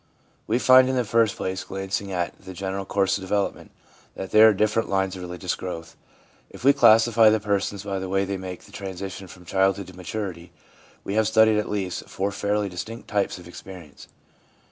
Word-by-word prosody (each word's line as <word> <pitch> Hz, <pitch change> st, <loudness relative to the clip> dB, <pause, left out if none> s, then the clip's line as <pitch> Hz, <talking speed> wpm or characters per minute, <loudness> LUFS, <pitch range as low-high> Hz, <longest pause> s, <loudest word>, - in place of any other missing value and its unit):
We 115 Hz, -, +2 dB
find, 130 Hz, 0 st, +6 dB
in 130 Hz, -, 0 dB
the 125 Hz, -, +1 dB
first 115 Hz, -1 st, +2 dB
place, 95 Hz, 0 st, -3 dB
glancing 95 Hz, +1 st, -4 dB
at 90 Hz, -2 st, -2 dB
the 95 Hz, -1 st, -9 dB
general 95 Hz, +1 st, -4 dB
course 95 Hz, 0 st, +1 dB
of -, -, -12 dB
development, 100 Hz, +1 st, -2 dB, 0.5 s
that 95 Hz, -, -6 dB
there 110 Hz, +1 st, +8 dB
are -, -, +5 dB
different 110 Hz, +2 st, 0 dB
lines 95 Hz, -1 st, 0 dB
of 95 Hz, -, -8 dB
religious 90 Hz, +1 st, -4 dB
growth. 85 Hz, -3 st, -7 dB, 0.5 s
If -, -, -13 dB
we 140 Hz, +2 st, +6 dB
classify 115 Hz, -3 st, +6 dB
the 110 Hz, 0 st, +2 dB
persons 100 Hz, -1 st, -2 dB
by 100 Hz, -1 st, -3 dB
the 95 Hz, 0 st, -5 dB
way 95 Hz, +1 st, +1 dB
they 100 Hz, 0 st, -3 dB
make 95 Hz, -1 st, -7 dB
the -, -, -17 dB
transition 95 Hz, 0 st, -7 dB
from 90 Hz, 0 st, -14 dB
childhood 95 Hz, +2 st, +1 dB
to 95 Hz, -, -13 dB
maturity, 90 Hz, -2 st, -6 dB, 0.5 s
we 100 Hz, -, -4 dB
have 110 Hz, 0 st, +2 dB
studied 110 Hz, -1 st, +4 dB
at 105 Hz, -, -3 dB
least 95 Hz, -4 st, -3 dB
four 100 Hz, +1 st, -2 dB
fairly 105 Hz, +1 st, -1 dB
distinct 110 Hz, +5 st, -7 dB
types 100 Hz, -2 st, 0 dB
of 90 Hz, -, -12 dB
experience. 85 Hz, -4 st, -12 dB
100 Hz, 195 wpm, -24 LUFS, 95-105 Hz, 0.5 s, there